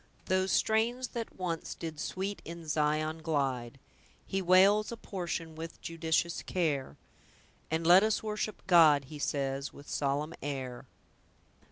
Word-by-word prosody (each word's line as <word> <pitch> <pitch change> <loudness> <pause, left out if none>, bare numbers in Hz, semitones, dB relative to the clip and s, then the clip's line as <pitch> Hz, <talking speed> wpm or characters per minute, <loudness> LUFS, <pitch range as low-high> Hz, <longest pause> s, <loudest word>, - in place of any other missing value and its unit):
"Those 185 0 +1
strains 235 +3 +1
that 230 -2 -6
once 175 -3 -3
did 160 -3 -6
sweet 195 +4 -3
in 170 -1 -8
Zion 155 +1 0
glide; 135 -6 -1 0.5
He 195 - -1
wales 195 +4 +5
a 235 - -5
portion 170 -5 -4
with 165 +1 -8
judicious 165 0 -1
care; 150 -7 -1 0.7
And 160 +1 -1
'Let 175 +3 +8
us 215 0 +1
worship 215 -1 -3
God', 155 -6 +6
he 150 - -7
says, 140 -1 -2
with 145 - -14
solemn 145 +3 -1
air." 130 -4 -5
165 Hz, 135 wpm, -31 LUFS, 145-190 Hz, 0.7 s, Let